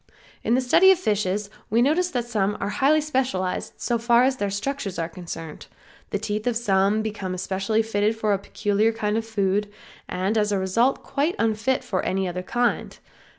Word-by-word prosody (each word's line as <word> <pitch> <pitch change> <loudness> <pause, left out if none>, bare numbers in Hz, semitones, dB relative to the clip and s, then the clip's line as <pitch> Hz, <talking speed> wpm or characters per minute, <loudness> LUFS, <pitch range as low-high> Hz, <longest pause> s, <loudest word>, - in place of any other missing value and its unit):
In 230 - +2
the 260 - +2
study 340 +9 +5
of 380 - +4
fishes 210 - -1 0.2
we 225 - +2
notice 340 +7 +2
that 245 -7 -2
some 210 -3 0
are 200 - -2
highly 290 +7 +3
specialized 255 -11 -1
so 235 -1 -1
far 235 +1 +4
as 260 0 +2
their 205 -3 -1
structures 200 0 -3
are 165 - -1
concerned; 165 -2 -8 0.4
the - - -1
teeth 215 +2 -3
of 240 -2 +1
some 205 -1 +2
become 205 -4 -4
especially 195 +4 0
fitted 215 0 0
for 215 -2 +1
a 195 - 0
peculiar 205 +2 0
kind 210 -1 -1
of 225 0 -2
food, 205 -1 0 0.4
and 190 +5 0
as 210 0 +1
a 200 - +1
result 230 +8 +1
quite 295 +6 -1
unfit 225 +4 0
for 185 - -1
any 190 0 -1
other 180 +1 -3
kind. 240 +6 -1
215 Hz, 190 wpm, -24 LUFS, 195-240 Hz, 0.4 s, study